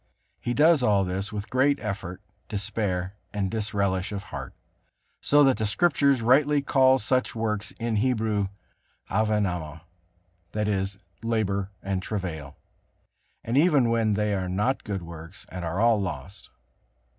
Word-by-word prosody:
He 120 - -2
does 155 0 +5
all 105 -5 +3
this 95 +3 -3
with 105 0 -6
great 140 +3 +3
effort, 95 -4 -5 0.3
despair 100 -3 -2 0.2
and 100 -2 -2
disrelish 100 -3 -1
of 100 -1 -4
heart, 70 -9 -8 0.7
so 145 0 +5
that 135 -2 +4
the 110 - 0
Scriptures 140 +1 +2
rightly 145 +5 +4
call 130 -1 +4
such 130 +1 0
works 110 -2 -1
in 115 -2 -1
Hebrew 110 -4 +1 0.6
Avenama, 95 -7 0 0.7
that 105 -1 -1
is, 95 -1 -1 0.2
labor 100 -4 -1
and 95 -1 -1
travail. 85 -8 -5 0.9
And 115 - -2
even 145 -7 +4
then 110 -3 +2
they 105 0 0
are 95 -2 -2
not 105 +9 0
good 100 -4 -4
works, 85 +2 -10
and 90 -1 -6
are 85 +3 -2
all 115 -2 +4
lost. 95 +1 -6
105 Hz, 140 wpm, -26 LUFS, 95-120 Hz, 0.9 s, does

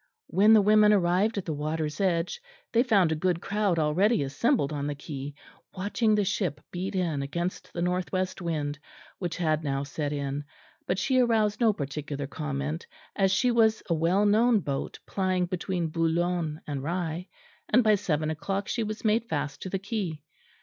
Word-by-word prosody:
When 210 +3 +5
the 215 -2 +6
women 210 +1 +6
arrived 195 +3 +2
at 195 - -2
the 160 - -2
water's 155 +2 -2
edge 180 - 0 0.3
they 230 - +4
found 200 -9 +3
a - - +1
good 175 +2 0
crowd 200 -2 0
already 160 +5 +2
assembled 150 - +1
on 145 -1 -2
the 145 - -2
quay, 145 -1 -7 0.4
watching 210 +3 +1
the 205 -1 +2
ship 185 -7 -1
beat 185 +2 -4
in 165 -6 0
against 170 +6 -4
the 170 - -3
north 180 0 -1
west 185 0 -2
wind, 150 -4 -2 0.4
which 175 -3 -3
had 155 -3 +1
now 135 -1 -1
set 145 +1 -3
in; 140 0 -3 0.4
but 180 - 0
she 255 +5 +2
aroused 225 -3 +2
no 225 -2 +5
particular 145 -4 -4
comment 150 +2 -4 0.3
as 195 -1 +3
she 245 +6 +3
was 220 -2 +3
a - - +5
well 170 +6 +2
known 220 +1 +4
boat 140 -3 -3
plying 185 -2 0
between 175 -1 -2
Boulogne 165 -1 0
and 145 -2 -4
Rye; 170 +3 -3 0.4
and 245 +3 +5
by 215 -1 +5
seven 155 -6 0
o'clock 195 +5 -3
she 235 - -1
was 215 +1 -4
made 220 +2 +3
fast 145 -2 -3
to 185 - -5
the 195 - -1
quay. 190 -7 -4
175 Hz, 180 wpm, -27 LUFS, 150-205 Hz, 0.4 s, the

